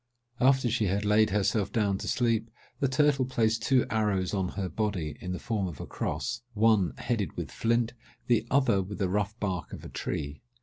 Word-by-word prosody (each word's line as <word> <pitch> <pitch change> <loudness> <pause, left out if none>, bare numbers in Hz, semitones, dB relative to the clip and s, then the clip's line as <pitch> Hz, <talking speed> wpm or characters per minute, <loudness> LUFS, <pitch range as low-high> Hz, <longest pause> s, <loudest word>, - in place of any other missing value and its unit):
After 130 0 +4
she 115 -1 +1
had 100 +2 0
laid 105 +1 +4
herself 105 0 +1
down 100 -4 +1
to - - -5
sleep, 115 -2 +1 0.3
the 140 - +2
turtle 135 +1 +3
placed 115 -3 +1
two 130 -2 +3
arrows 105 -4 +1
on 95 -3 0
her 95 -2 -1
body, 95 -7 -2
in 90 - -4
the 90 - -2
form 105 -3 -2
of 80 -6 -7
a - - -5
cross—one 110 -5 0
headed 105 -9 -2
with - - -4
flint, 115 0 +1 0.3
the 115 -2 +2
other 125 -7 +3
with 95 +2 -6
the 95 -3 0
rough 105 +3 -1
bark 95 -5 -2
of - - -8
a - - -7
tree. 70 +1 -4
105 Hz, 190 wpm, -29 LUFS, 95-120 Hz, 0.3 s, After